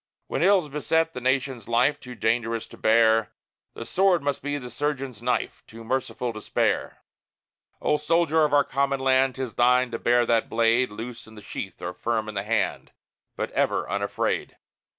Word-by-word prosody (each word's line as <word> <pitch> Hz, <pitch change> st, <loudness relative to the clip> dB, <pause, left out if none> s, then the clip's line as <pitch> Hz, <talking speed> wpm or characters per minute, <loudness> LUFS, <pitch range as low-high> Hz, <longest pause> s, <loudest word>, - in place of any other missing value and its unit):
When -, -, -3 dB
ills 185 Hz, -2 st, +4 dB
beset 160 Hz, +3 st, 0 dB
the 125 Hz, -, -6 dB
nation's 130 Hz, -3 st, -1 dB
life 130 Hz, +5 st, +2 dB
Too 125 Hz, -2 st, -10 dB
dangerous 115 Hz, 0 st, -1 dB
to -, -, -13 dB
bear, 110 Hz, 0 st, +4 dB, 0.5 s
The -, -, -6 dB
sword 185 Hz, -5 st, +2 dB
must 140 Hz, -1 st, -1 dB
be 145 Hz, +1 st, -2 dB
the 125 Hz, -3 st, -8 dB
surgeon's 135 Hz, -2 st, -3 dB
knife, 125 Hz, +1 st, -1 dB
Too 115 Hz, 0 st, -11 dB
merciful 125 Hz, 0 st, -2 dB
to 110 Hz, -, -8 dB
spare. -, -, -1 dB, 0.8 s
O 150 Hz, -, +2 dB
Soldier 160 Hz, +1 st, +2 dB
of 150 Hz, -, +2 dB
our 145 Hz, 0 st, +5 dB
common 140 Hz, 0 st, 0 dB
land, 130 Hz, 0 st, +2 dB
'Tis 130 Hz, -3 st, -4 dB
thine 125 Hz, 0 st, +3 dB
to 115 Hz, -, -4 dB
bear 120 Hz, 0 st, +3 dB
that 115 Hz, -1 st, +1 dB
blade 115 Hz, +2 st, +2 dB
Loose 115 Hz, +3 st, -8 dB
in 110 Hz, -, -14 dB
the 105 Hz, -, -11 dB
sheath, 95 Hz, -, -7 dB
or 90 Hz, +1 st, -3 dB
firm 115 Hz, 0 st, -2 dB
in 110 Hz, -, -7 dB
hand, 105 Hz, +1 st, -1 dB, 0.4 s
But -, -, -3 dB
ever -, -, 0 dB
unafraid. -, -, -2 dB
125 Hz, 175 wpm, -25 LUFS, 115-145 Hz, 0.8 s, our